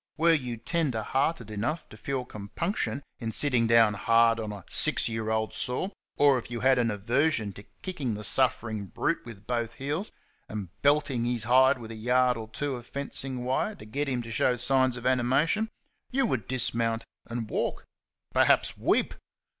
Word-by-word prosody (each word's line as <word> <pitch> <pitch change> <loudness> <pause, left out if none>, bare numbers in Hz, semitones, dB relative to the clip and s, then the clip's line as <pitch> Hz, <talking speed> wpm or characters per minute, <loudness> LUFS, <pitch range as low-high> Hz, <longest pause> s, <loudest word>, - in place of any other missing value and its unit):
Were 165 +1 +5
you 125 -6 -1
tender 135 -3 -1
hearted 130 -2 -1
enough 120 +11 -2
to - - -12
feel 135 -2 -3
compunction 140 - -3 0.2
in 115 -2 -3
sitting 125 -3 +3
down 115 -2 +5
hard 115 +2 +3
on 110 -1 -4
a 105 - -8
six - - +3
year 110 -1 -3
old 110 0 0
sore, 125 - -1 0.3
or 140 -3 +5
if 115 - -11
you 120 -1 -4
had 130 0 +4
an 115 -1 +2
aversion 115 +2 0
to 100 +2 -12 0.2
kicking 145 - -3
the 105 - -6
suffering 110 -3 0
brute - - -1
with 110 -3 -10
both 120 -1 -2
heels 150 +9 -3 0.4
and 105 -4 -5
belting 140 -4 +2
his 120 -2 -1
hide 130 +3 +5
with 115 -2 -9
a - - -6
yard 125 +3 +2
or 110 -1 -6
two 145 +4 -3
of 120 0 -12
fencing 135 -2 -3
wire 130 +12 0
to - - -12
get 140 +6 -2
him 125 -2 -1
to 115 - -8
show 125 +2 +2
signs 130 +1 +2
of 120 - -9
animation, 130 - +2 0.4
you 265 +1 +1
would 125 - -1
dismount 115 -3 0 0.2
and 115 -2 -4
walk - - -2 0.5
perhaps, - - +3
weep. - - +2
125 Hz, 180 wpm, -28 LUFS, 115-135 Hz, 0.5 s, Were